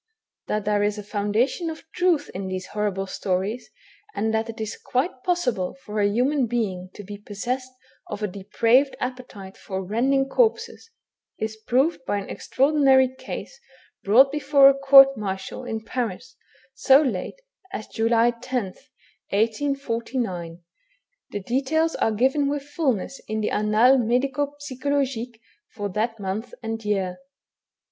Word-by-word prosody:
That 210 -1 -2
there 210 0 +2
is 205 +1 0
a 210 - -6
foundation 210 - 0
of 320 0 -8
truth 350 -5 +1
in 190 +1 -4
these 185 0 -4
horrible 205 -2 -2
stories, 195 +5 -3 0.5
and 220 +1 0
that 220 +1 0
it 225 - -7
is 220 -1 -4
quite 255 +1 -2
possible 255 - 0
for 210 0 -3
a 205 - +3
human 255 +4 +1
being 195 -6 -2
to 205 - -9
be 205 +1 -9
possessed 245 +6 -4 0.4
of 210 0 -6
a - - +1
depraved 230 +8 +2
appetite 250 -7 -6
for 190 -1 -5
rending 265 +7 +1
corpses, 455 - 0 0.5
is 220 0 -3
proved 260 +8 0
by 205 - 0
an 200 - -5
extraordinary 270 -2 +3
case 260 - -8 0.4
brought 255 +7 +6
before 285 -2 +6
a - - +4
court 275 0 +7
martial 195 +4 -5
in 220 -2 -4
Paris, 250 +1 -4 0.4
so 270 0 +5
late 250 - -3 0.3
as 215 - -5
July 230 +1 +2
10th, 245 -1 -5 0.4
1849. 230 -6 -2 0.7
The 205 - -5
details 280 - 0
are 225 - +1
given 265 +6 +2
with 285 -1 -2
fulness 275 - -2
in 220 0 -2
the 210 - -1
Annates 220 +5 +4
Medico 275 +5 0
psychologiques 260 -4 -2 0.4
for 205 -1 -3
that 225 +4 -2
month 200 +4 -4
and 225 0 -4
year. 195 -3 -1
235 Hz, 140 wpm, -24 LUFS, 205-270 Hz, 0.7 s, court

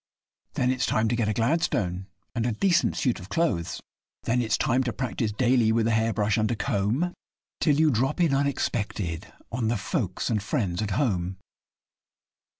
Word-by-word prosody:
Then 125 0 +1
it's 130 -1 0
time 110 +1 +2
to 120 - +1
get 115 -3 0
a - - +1
'Gladstone' 110 - 0 0.3
and 115 0 0
a 120 - 0
decent 175 - +2
suit 125 -6 0
of 90 +1 -11
clothes; 105 - 0 0.4
Then 125 +2 +1
it's 115 -2 +1
time 130 +2 +2
to 120 - 0
practise 120 -4 -2
daily 120 0 +3
with 115 0 +2
a 115 - +2
hair 110 0 +2
brush 105 +1 +1
and 110 - +1
a 120 - 0
comb, 115 - 0 0.5
Till 150 -2 +3
you 155 -1 +5
drop 135 +6 0
in 165 -5 +3
unexpected 105 - -1 0.2
on 115 -1 -1
the 115 +1 +1
folks 100 - -2
and 105 -2 +1
friends 95 -3 -1
at 105 - -2
home. 95 -9 0
115 Hz, 180 wpm, -26 LUFS, 105-130 Hz, 0.5 s, you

